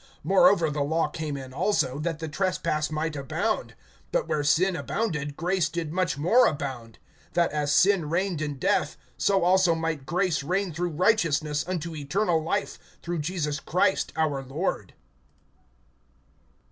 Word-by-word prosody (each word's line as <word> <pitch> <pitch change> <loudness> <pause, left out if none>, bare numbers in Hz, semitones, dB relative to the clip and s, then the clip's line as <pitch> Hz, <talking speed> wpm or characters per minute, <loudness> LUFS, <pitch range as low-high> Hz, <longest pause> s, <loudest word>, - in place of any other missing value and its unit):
(20)Moreover 180 -4 +4
the 150 - -2
law 160 +3 +1
came 155 -3 -4
in 130 -1 -9
also, 140 -4 0
that 165 0 -2
the 160 0 -5
trespass 160 -2 -1
might 155 0 -2
abound. 160 +10 -2 0.4
But - - 0
where 150 - 0
sin 175 +6 +3
abounded, 160 -9 -3
grace 175 -2 0
did 160 -1 -4
much 180 -6 0
more 200 - +5
abound; 130 -7 -4 0.4
(21)that 170 -1 +3
as 150 -1 -1
sin 185 -6 +3
reigned 175 -1 -1
in 150 -2 -2
death, - - 0 0.2
so 195 -3 +2
also 180 -1 +4
might 160 -4 -3
grace 180 -1 +1
reign 180 +4 -1
through 175 +3 -2
righteousness 160 -7 +2
unto 170 -3 -3
eternal 165 +4 0
life, 200 +6 -2 0.2
through 170 -1 -3
Jesus 150 -2 -2
Christ 180 +4 +1
our 150 -4 0
Lord. 135 - -3
165 Hz, 145 wpm, -26 LUFS, 150-185 Hz, 0.4 s, more